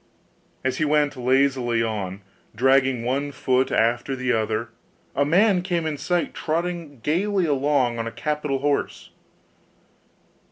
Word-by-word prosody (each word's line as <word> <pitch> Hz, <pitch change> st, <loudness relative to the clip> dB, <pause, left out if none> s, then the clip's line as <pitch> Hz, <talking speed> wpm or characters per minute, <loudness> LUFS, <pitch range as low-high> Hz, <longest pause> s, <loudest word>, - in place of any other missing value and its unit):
As 130 Hz, 0 st, -1 dB
he -, -, +2 dB
went 150 Hz, -1 st, +2 dB
lazily 130 Hz, -2 st, +2 dB
on, 100 Hz, -3 st, -4 dB, 0.3 s
dragging 130 Hz, 0 st, +3 dB
one 140 Hz, +3 st, -1 dB
foot 130 Hz, -1 st, 0 dB
after 120 Hz, +4 st, +1 dB
another, 115 Hz, -3 st, -1 dB, 0.5 s
a 140 Hz, -, +3 dB
man 180 Hz, +5 st, +3 dB
came 175 Hz, -3 st, -1 dB
in 155 Hz, -1 st, -1 dB
sight, 170 Hz, +5 st, -1 dB
trotting 165 Hz, -4 st, -3 dB
gaily 185 Hz, -, +1 dB
along 140 Hz, -5 st, +1 dB
on 115 Hz, -, -2 dB
a -, -, -4 dB
capital 150 Hz, -1 st, -2 dB
horse. 145 Hz, 0 st, -1 dB
135 Hz, 125 wpm, -23 LUFS, 120-150 Hz, 0.5 s, dragging